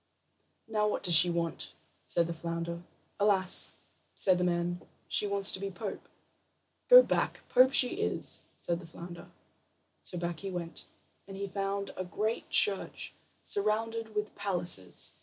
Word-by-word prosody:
"Now, 215 -1 0
what 210 - -3
does 180 -3 +5
she 165 +2 +10
want?" 170 -1 -3 0.3
said 170 - +1
the 170 - -5
flounder. 170 +1 -5 0.4
"Alas," 195 -3 +3 0.4
said 185 -2 +2
the - - 0
man, 175 0 -1 0.3
"she 210 - +2
wants 200 0 +5
to - - 0
be 195 0 -4
pope." 195 +2 -8 0.8
"Go - - +10
back. - - -2
Pope 255 +1 +5
she 270 +5 +4
is," - - -1 0.2
said 170 -1 -3
the 175 - -12
flounder. 170 +1 -11 0.7
So 180 - -6
back 170 -1 -4
he 195 - -6
went, 175 -2 -7 0.4
and 195 -1 -9
he 200 - -4
found 195 0 -4
a 185 - -4
great 215 +6 -4
church, 200 -2 0 0.3
surrounded 220 +2 -2
with 210 0 -3
palaces. 175 - -1
190 Hz, 150 wpm, -30 LUFS, 170-210 Hz, 0.8 s, she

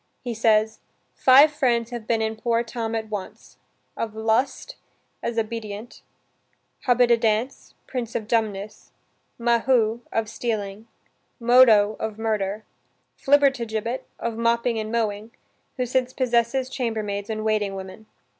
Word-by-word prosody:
He 245 -2 -3
says, 220 -1 +2 0.3
"Five 275 +4 +6
friends 240 -5 0
have 235 -2 -6
been 225 -1 +1
in 220 0 -2
poor 230 +1 0
Tom 230 -1 -4
at 220 -1 -3
once: 205 -3 -7 0.4
of 220 -1 -4
lust, 225 +4 0 0.5
as 235 -1 -3
Obidient; 220 0 -5 0.9
Hobbididance, 235 0 +2
prince 240 -3 -5
of 215 -2 -3
dumbness; 215 -3 -2 0.4
Mahu, 235 -1 +2
of 225 -1 -1
stealing; 215 -2 -4 0.5
Modo, 230 -4 +5
of 220 -1 -4
murder; 215 -2 -2 0.5
Flibbertigibbet, 255 -4 +1 0.2
of 230 -1 -4
mopping 235 0 +1
and 215 0 -4
mowing; 220 -1 -2 0.4
who 250 - 0
since 255 +1 0
possesses 250 +1 +1
chambermaids 220 -6 -3
and 215 0 -3
waiting 210 -2 0
women." 190 +3 -9
225 Hz, 120 wpm, -24 LUFS, 215-240 Hz, 0.9 s, Five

